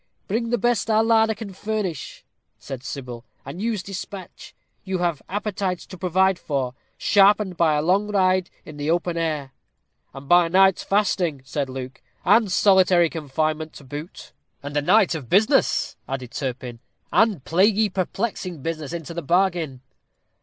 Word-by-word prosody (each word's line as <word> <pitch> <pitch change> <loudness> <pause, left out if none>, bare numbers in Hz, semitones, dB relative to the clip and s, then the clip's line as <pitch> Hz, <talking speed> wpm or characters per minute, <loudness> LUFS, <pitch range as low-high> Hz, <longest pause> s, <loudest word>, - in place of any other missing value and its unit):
"Bring 230 +3 -1
the 240 - +1
best 240 -2 0
our 220 0 +4
larder 225 -1 +3
can 205 -2 -8
furnish," 205 -6 -4 0.3
said 135 -2 -8
Sybil, 125 -4 -7 0.2
"and 140 +8 -7
use 220 -4 -1
despatch. 195 -1 -8 0.3
You 190 -1 -2
have 175 -4 -1
appetites 195 -2 -2
to 190 - -10
provide 185 +1 +1
for, 135 -4 -2 0.2
sharpened 200 -1 +4
by 165 -3 +3
a 150 - 0
long 195 +5 +2
ride 185 -3 +2 0.2
in 155 -2 -10
the 145 +1 -3
open 175 +1 0
air." 155 -5 -2 0.6
"And 135 +1 -11
by 175 +1 +5
a - - -6
night's 190 +1 +4
fasting," 185 -8 0
said 140 +1 -3
Luke, 130 0 -7 0.2
"and 220 -4 +4
solitary 185 -3 +4
confinement 155 +1 -2
to - - -12
boot." 145 - -9 0.3
"And 145 +1 -6
a 145 - +2
night 190 +5 +4
of 145 -8 -6
business," 220 +8 +2
added 130 -2 -5
Turpin 125 -2 -5 0.3
"and 210 - +2
plaguy 205 +5 +3
perplexing 185 - -3
business 160 -2 -4
into 170 -1 -6
the 170 - -4
bargain." 170 -5 0
175 Hz, 155 wpm, -23 LUFS, 145-200 Hz, 0.6 s, by